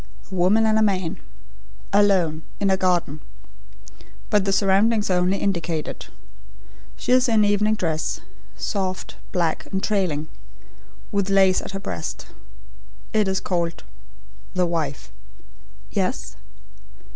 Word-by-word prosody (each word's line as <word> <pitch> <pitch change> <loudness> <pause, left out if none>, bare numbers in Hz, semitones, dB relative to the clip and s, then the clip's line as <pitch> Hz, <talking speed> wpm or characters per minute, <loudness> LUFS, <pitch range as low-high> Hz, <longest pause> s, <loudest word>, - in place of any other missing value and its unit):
"A - - -7
woman 190 +5 +3
and 220 0 +3
a - - +2
man... 190 -5 0 0.7
alone, 190 -6 +3 0.2
in 200 -1 +2
a - - +5
garden 180 -5 0 1.1
but 205 -2 +3
the 195 - +1
surroundings 200 +2 +3
are 180 - +3
only 180 +2 +2
indicated. 170 -6 -2 0.9
She - - -2
is 255 0 +5
in 220 -2 +4
evening 210 +1 +2
dress; 160 -6 -1 0.4
soft, 190 -2 -3
black, 170 -3 0
and 190 0 -2
trailing; 180 -8 0 0.8
with 200 -1 0
lace 190 -1 +4
at - - -7
her 195 - -3
breast. 85 - -5 0.9
It 215 -2 +3
is 190 0 +1
called: 170 -2 -2 0.7
'The 180 -1 +3
Wife.'" 155 - -3 0.8
"Yes?" - - -2
190 Hz, 120 wpm, -23 LUFS, 170-205 Hz, 1.1 s, a